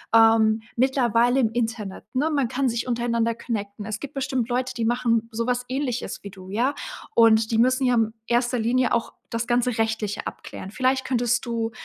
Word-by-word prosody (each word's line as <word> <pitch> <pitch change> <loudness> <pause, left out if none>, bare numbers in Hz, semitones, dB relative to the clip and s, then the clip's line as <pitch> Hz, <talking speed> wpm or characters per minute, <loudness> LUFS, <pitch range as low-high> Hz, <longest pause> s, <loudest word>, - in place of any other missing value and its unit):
ähm, 225 -1 +5 0.2
mittlerweile 245 -1 +3
im 225 - +2
Internet, 225 -4 -3
ne, 285 +5 +1
man 280 -5 +1
kann 260 +2 0
sich 235 +2 -2
untereinander 235 -1 0
connecten. 205 -3 -5
Es 215 0 -4
gibt 285 - -7
bestimmt 260 -3 -1
Leute, 255 +1 -1
die 230 -2 -1
machen 230 -1 +1
sowas 245 +2 -1
Ähnliches 255 -2 -3
wie 200 - -6
du, 185 -1 -12
ja? 240 +8 +1 0.4
Und 225 -1 +5
die 225 - +2
müssen 255 +3 +3
ja 250 -1 +3
in 225 -1 +1
1. 240 +1 +1
Linie 245 +3 +1
auch 235 -1 0 0.2
das 230 0 -1
ganze 245 -1 +1
Rechtliche 220 -2 -1
abklären. 195 - -8
Vielleicht 260 +3 +1
könntest 240 -2 +1
du, 230 -1 -2
235 Hz, 180 wpm, -24 LUFS, 225-250 Hz, 0.4 s, ähm